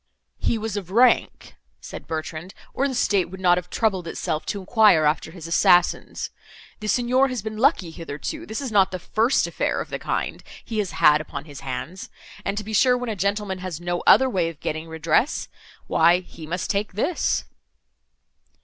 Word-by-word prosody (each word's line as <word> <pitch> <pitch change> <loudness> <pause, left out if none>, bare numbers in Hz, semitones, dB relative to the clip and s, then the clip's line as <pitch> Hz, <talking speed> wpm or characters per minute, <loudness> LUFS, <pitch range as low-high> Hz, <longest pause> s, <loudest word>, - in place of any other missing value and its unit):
"He 230 - 0
was 220 -1 -4
of 190 -4 -5
rank," 240 +5 +2 0.3
said - - -9
Bertrand, 160 +3 -5 0.2
"or 275 - +1
the 265 - -4
State 195 -7 +1
would 190 +1 -9
not 180 -1 +4
have 180 0 -12
troubled 190 -6 0
itself 155 -1 -3
to 205 - -2
enquire 195 -5 +4
after 150 +2 +1
his 170 0 -10
assassins. 175 +1 +2 0.5
The 215 - -6
Signor 250 +4 +3
has 250 -6 -4
been 220 0 -5
lucky 240 - +2
hitherto; 165 - -6
this 220 +5 -4
is 265 -4 -4
not 195 -3 +4
the 185 - -4
first 225 +8 +1
affair - - -1
of - - -6
the - - -3
kind - - -3 0.2
he 225 -2 -3
has 200 -4 -2
had 150 0 +5
upon 145 -2 -7
his 145 -4 -10
hands; 140 +8 -6 0.3
and 200 +1 -2
to 210 - -2
be 220 +2 -7
sure, 250 +4 +4
when 250 -1 -4
a - - -3
gentleman 200 0 -1
has 180 -3 -5
no 175 0 -2
other 265 - +7
way 180 -9 0
of 160 -3 -11
getting 155 +1 -4
redress—why 165 - 0
he 165 -3 -12
must 175 +2 -2
take 200 -1 -2
this." 280 - 0
190 Hz, 185 wpm, -23 LUFS, 165-220 Hz, 0.5 s, other